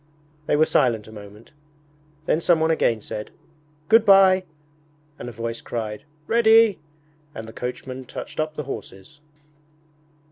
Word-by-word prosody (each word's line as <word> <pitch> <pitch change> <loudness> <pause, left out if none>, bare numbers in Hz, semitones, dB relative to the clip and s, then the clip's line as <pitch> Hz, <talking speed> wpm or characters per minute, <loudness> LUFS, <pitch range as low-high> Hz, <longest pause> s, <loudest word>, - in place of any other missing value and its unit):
They - - +2
were 155 +1 +4
silent 115 -8 +1
a - - -12
moment. 105 +1 -13 0.7
Then 160 - +1
someone 165 -2 +3
again 115 -8 +1
said, 105 +1 -7 0.6
'Good 225 +3 +5
bye,' 190 -2 +5 0.7
and 120 - -6
a - - -8
voice 115 0 -5
cried, 110 +1 -5 0.2
'Ready,' 225 -2 +4 0.6
and 110 0 -7
the 110 - -11
coachman 125 +1 -6
touched - - -8
up 155 0 -2
the 150 - -4
horses. 140 +1 -9
130 Hz, 135 wpm, -23 LUFS, 110-170 Hz, 0.7 s, Good